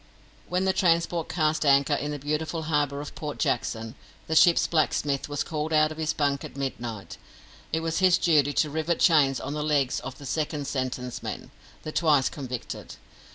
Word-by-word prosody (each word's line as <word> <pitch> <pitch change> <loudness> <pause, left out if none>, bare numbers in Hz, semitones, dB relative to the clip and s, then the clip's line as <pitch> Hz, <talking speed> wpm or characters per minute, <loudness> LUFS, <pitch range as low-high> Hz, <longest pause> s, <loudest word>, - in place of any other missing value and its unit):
When 180 +1 0
the 190 - +2
transport 170 -2 +1
cast 155 -2 +1
anchor 140 0 +4
in 145 +1 -1
the 150 - -3
beautiful 155 +3 -2
harbour 145 -2 0
of 150 - -8
Port 150 -1 -6
Jackson, 115 -2 -1 0.3
the 160 - -2
ship's 170 +1 +6
blacksmith 145 -3 0
was 145 -1 -1
called 155 -1 -3
out 155 0 +4
of 155 - -8
his 155 -1 0
bunk 140 -2 0
at - - -9
midnight. 120 -8 -5 0.5
It 160 - 0
was 165 0 -1
his 185 -1 +5
duty 150 -4 +3
to 150 +1 +1
rivet 160 +2 -1
chains 145 -6 +4
on 145 - -5
the 150 - -3
legs 145 -4 +1
of 135 - -8
the 140 - -11
second 150 +1 -2
sentence 130 -2 -3
men - - -6 0.3
the 155 - -5
twice 150 -5 +3
convicted. 130 -4 -7
150 Hz, 185 wpm, -26 LUFS, 140-160 Hz, 0.5 s, ship's